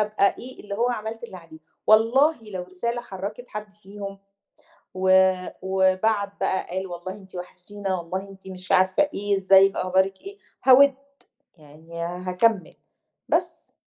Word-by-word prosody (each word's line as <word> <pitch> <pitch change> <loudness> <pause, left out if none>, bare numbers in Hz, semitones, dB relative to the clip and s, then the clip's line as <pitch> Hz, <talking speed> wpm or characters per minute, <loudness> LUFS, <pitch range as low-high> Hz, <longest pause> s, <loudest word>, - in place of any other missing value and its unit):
أبقى 210 -1 +2
إيه 255 +1 -9
اللي 200 -1 -6
هو 240 +4 +1
عملت 225 0 -5
اللي 190 - -9
عليّه، 165 -2 -14 0.3
والله 240 +8 +5
لو 185 -2 -4
رسالة 235 +7 -4
حرّكت 205 +4 -7
حد 210 -1 -7
فيهم 200 0 -9 0.8
و 190 0 +5 0.3
وبعت 190 +2 +1
بقى 190 - 0
قال 190 +1 -3
والله 175 +1 -7
أنتِ 190 -2 -15
وحشتينا 190 +2 -5
والله 185 +4 -5
أنتِ 190 0 -13
مش 185 -1 -6
عارفة 190 +11 +3
إيه، 200 -1 0
إزيك 195 +1 +5
أخبارك 190 +1 +1
إيه، 400 +1 -10 0.3
هاود 270 +1 +7 0.6
يعني 160 +3 -10
هاكمّل 180 +3 0 0.5
بس. - - -2
195 Hz, 140 wpm, -24 LUFS, 185-215 Hz, 0.8 s, هاود